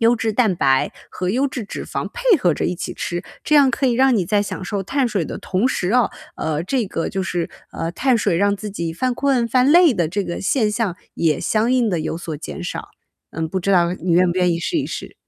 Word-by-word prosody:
优 235 +1 +4
质 220 -1 -1
蛋 215 -6 +2
白， 135 -3 +2 0.2
和 180 0 -3
优 260 +8 +1
质 260 -3 -5
脂 205 - -6
肪 - - -4
配 485 -3 +3
合 175 -4 +2
着 - - -2
一 180 - 0
起 175 - -5
吃， 175 0 -3 0.2
这 300 - +2
样 280 -3 +6
可 270 - 0
以 245 - +3
让 260 0 +4
你 185 - +1
在 205 +2 +2
享 190 -2 -5
受 200 +1 -2
碳 265 +6 0
水 195 -8 -1
的 - - -5
同 195 +7 0
时 185 -7 -1
哦， 250 -2 +3 0.3
呃， 155 0 -2
这 245 -1 0
个 165 - -3
就 190 -1 -2
是， 175 -2 -2 0.2
呃， 165 +1 -4
碳 255 +4 +2
水 170 -6 +1
让 200 0 +2
自 210 +1 -6
己 170 -4 -4
犯 255 +7 0
困、 265 -4 +1
犯 255 +4 +3
累 340 -3 +7
的 170 -7 0
这 200 +3 -2
个 170 - -4
现 215 +2 +1
象， 210 -5 -1 0.2
也 155 -4 +1
相 220 +2 +1
应 250 -4 +2
地 175 -4 0
有 160 - -3
所 165 -2 -5
减 175 +3 -7
少。 - - -5 0.4
嗯， 160 +1 -2
不 185 +4 -3
知 200 - -1
道 175 -2 +3
你 180 -1 -4
愿 180 +2 +5
不 185 - -2
愿 180 -1 +3
意 165 - -1
试 325 - -1
一 - - -1
试。 - - -7
200 Hz, 275 characters per minute, -20 LUFS, 175-250 Hz, 0.4 s, 累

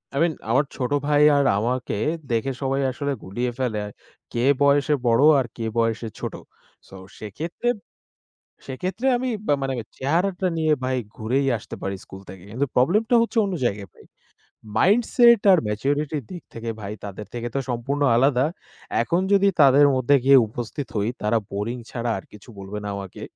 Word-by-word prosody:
I - - 0
mean 170 -2 +1 0.2
আমার 135 +5 +3
ছোট 125 0 -3 0.2
ভাই 145 0 +3 0.2
আর 140 - +2
আমাকে 125 -1 -2 0.3
দেখে 115 +4 0
সবাই 135 +1 0
আসলে 140 +1 -3
গুলিয়ে 120 +6 -3
ফেলে। 110 -5 -1 0.5
কে 120 +1 -1 0.2
বয়সে 140 +1 +3
বড়, 115 +3 +4 0.2
আর 130 - 0
কে 115 - -4
বয়সে 115 0 0
ছোট। - - -4 0.5
তো 95 - -13 0.2
সেক্ষেত্রে, 160 - -4 1.0
সেক্ষেত্রে 185 - -3
আমি 255 +1 -2 0.2
বা 145 - +4
মানে 135 0 -1 0.2
চেহারাটা 180 +7 0
নিয়ে 155 -1 +2
ভাই 130 0 0 0.2
ঘুরেই 130 +5 0
আসতে - - -9
পারি 100 0 -3
স্কুল 95 0 -11
থেকে। 95 -1 -11
কিন্তু 135 +5 0
প্রবলেম 170 - +3
টা 240 - +4
হচ্ছে 230 0 -2
অন্য 195 - -3
জায়গায় 100 -3 -2
ভাই। - - -19 0.7
মাইন্ডসেট 235 +2 +5
আর 185 - +6
ম্যাচুরিটি 140 +8 -1
এর - - -12
দিক 175 -2 -8
থেকে 115 0 -5
ভাই 100 +1 -5
তাদের 100 0 -7
থেকে 120 0 -4
তো - - +2
সম্পূর্ণ 130 +4 -2
আলাদা। 130 +1 +3 0.6
এখন 170 +9 0
যদি 200 0 +4
তাদের 140 +1 +7
মধ্যে 130 +3 +3
গিয়ে 135 0 +7
উপস্থিত 120 +5 -6
হই 105 +2 0
তারা 105 +2 +2
বোরিং 105 +5 -3
ছাড়া 120 -1 -2
আর - - -8
কিছু 105 +3 -15
বলবে 100 +2 -7
না - - -4
আমাকে। 95 -2 -9
130 Hz, 170 wpm, -23 LUFS, 115-150 Hz, 1.0 s, তাদের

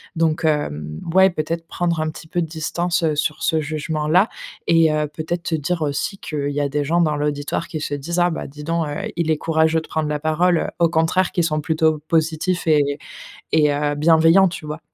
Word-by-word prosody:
Donc, 165 0 +1
hem, 75 - -1
ouais, 190 +1 +6
peut-être 165 0 -3
prendre 170 -2 -1
un 155 - -1
petit 160 - -10
peu 175 +2 -1
de 165 - -2
distance, 170 +2 -2
heu, 155 -2 +1
sur 150 +1 -1
ce 160 -2 +2
jugement-là 155 +4 +1 0.4
et 165 -1 +4
heu, 150 0 0
peut-être 160 +3 -4
te - - -3
dire 160 +2 -1
aussi 145 +7 -2
qu'il 145 -2 -3
y 145 +1 -1
a 145 - +1
des 145 +1 -1
gens 160 +4 -1
dans 155 -3 +1
l'auditoire 145 +2 -2
qui 155 -2 -5
se 145 - -3
disent: 170 +5 -2
«Ah 175 - +4
bah, - - -4
dis 150 +2 -10
donc, 165 0 -1
heu, 145 - -4 0.2
il 170 -2 0
est 155 - +2
courageux 160 0 +1
de - - -13
prendre 155 -1 -2
la 150 - 0
parole», 160 +3 +1
au 170 - +5
contraire, 165 +3 +1
qui 175 - +1
sont 155 -2 0
plutôt 160 -2 +1
positifs 165 +2 0
et 145 -2 +3 0.6
et 150 -2 +4
heu, 145 0 0
bienveillants, 165 +4 +5
tu 165 -2 -7
vois? 150 +2 -5
160 Hz, 215 wpm, -21 LUFS, 150-170 Hz, 0.6 s, ouais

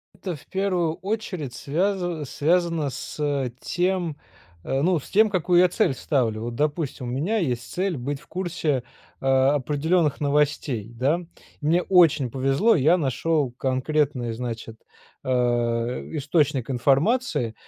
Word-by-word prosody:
Это 180 -4 -5
в - - -15
первую 185 -4 0
очередь 185 - -4
связа 175 - -1
связано 165 0 +1
с 140 -2 -3
тем, 175 -4 -1 0.5
ну, 155 +5 +1
с - - -13
тем 215 +2 +4
какую 180 -2 +2
я 180 - +5
цель 180 - +1
ставлю. 115 -6 -1
Вот, 120 0 -4
допустим, 145 -4 -2
у - - -3
меня 170 - 0
есть 120 - -2
цель 185 -2 -1
быть 135 +3 -4
в - - -20
курсе, 165 -8 -2 0.4
э, - - -7
определенных 145 +4 +2
новостей, 140 -6 0
да. 145 +8 +1 0.4
Мне 165 +4 +2
очень 165 -9 +4
повезло, 135 - +2
я 160 +5 +4
нашел 145 -1 0
конкретный 130 -1 -1
значит, 115 -2 -6 0.5
э, - - -3 0.8
источник 145 -3 0
информации, 140 - +1
150 Hz, 130 wpm, -24 LUFS, 130-175 Hz, 0.8 s, я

